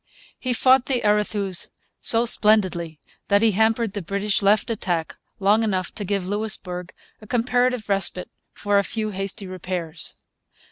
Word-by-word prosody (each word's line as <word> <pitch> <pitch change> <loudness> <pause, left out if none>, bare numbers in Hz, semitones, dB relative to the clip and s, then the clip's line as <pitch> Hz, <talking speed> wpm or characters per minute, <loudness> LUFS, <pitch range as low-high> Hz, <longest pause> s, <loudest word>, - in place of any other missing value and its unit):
He 255 - -2
fought 255 +1 +4
the 255 -3 0
Arethuse 210 -3 +1 0.3
so 230 +1 +5
splendidly 185 -8 +2 0.3
that 200 +2 +3
he 225 - +5
hampered 220 +1 +1
the 205 - -4
British 200 +4 -1
left 205 +3 +3
attack 175 -7 -2 0.2
long 205 +3 +3
enough 190 -5 -1
to 210 - -5
give 195 -1 -2
Louisbourg 190 -4 -3 0.3
a 215 - -13
comparative 245 -1 +1
respite 195 -2 -1 0.2
for 205 0 +1
a - - +1
few 215 +1 -3
hasty 195 +1 -5
repairs. 180 -3 -5
205 Hz, 145 wpm, -23 LUFS, 185-220 Hz, 0.3 s, so